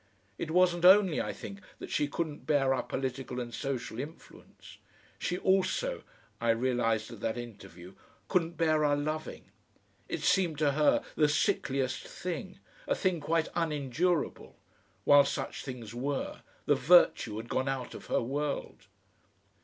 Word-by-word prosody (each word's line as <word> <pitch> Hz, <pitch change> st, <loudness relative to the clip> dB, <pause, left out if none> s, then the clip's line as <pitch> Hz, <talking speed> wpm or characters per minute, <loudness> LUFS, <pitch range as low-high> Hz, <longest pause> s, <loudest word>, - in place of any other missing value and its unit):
It 160 Hz, -, -3 dB
wasn't 175 Hz, 0 st, +3 dB
only, 190 Hz, -2 st, +6 dB
I -, -, -3 dB
think, 200 Hz, 0 st, -9 dB, 0.2 s
that -, -, -9 dB
she 145 Hz, -, +1 dB
couldn't 145 Hz, -3 st, -4 dB
bear 140 Hz, -3 st, +3 dB
our 130 Hz, -, 0 dB
political 130 Hz, -1 st, -4 dB
and 120 Hz, -1 st, -5 dB
social 125 Hz, -3 st, -4 dB
influence; 150 Hz, +5 st, -11 dB, 0.4 s
she 180 Hz, -, -1 dB
also 195 Hz, -, +1 dB, 0.4 s
I 115 Hz, -, 0 dB
realised 115 Hz, -2 st, +1 dB
at 115 Hz, -, -9 dB
that 110 Hz, +3 st, -2 dB
interview 95 Hz, -6 st, -10 dB, 0.3 s
couldn't 170 Hz, -3 st, 0 dB
bear 155 Hz, -2 st, +2 dB
our 145 Hz, -1 st, +3 dB
loving. 155 Hz, +2 st, -4 dB, 0.6 s
It -, -, -3 dB
seemed 175 Hz, -6 st, +2 dB
to 150 Hz, -1 st, +2 dB
her 150 Hz, +1 st, +3 dB
the 150 Hz, -2 st, +4 dB
sickliest 135 Hz, -, 0 dB
thing, 180 Hz, -1 st, -5 dB, 0.3 s
a -, -, +2 dB
thing 185 Hz, -4 st, 0 dB
quite 160 Hz, +2 st, 0 dB
unendurable. 160 Hz, +1 st, -1 dB, 0.5 s
While 145 Hz, 0 st, +7 dB
such -, -, -4 dB
things 120 Hz, -5 st, -7 dB
were, 135 Hz, +3 st, -3 dB, 0.2 s
the -, -, +4 dB
virtue 130 Hz, -8 st, +4 dB
had 115 Hz, +1 st, -6 dB
gone 130 Hz, +2 st, -1 dB
out 130 Hz, -2 st, -3 dB
of -, -, -10 dB
her -, -, +1 dB
world. 140 Hz, +4 st, -3 dB
145 Hz, 145 wpm, -30 LUFS, 125-165 Hz, 0.6 s, While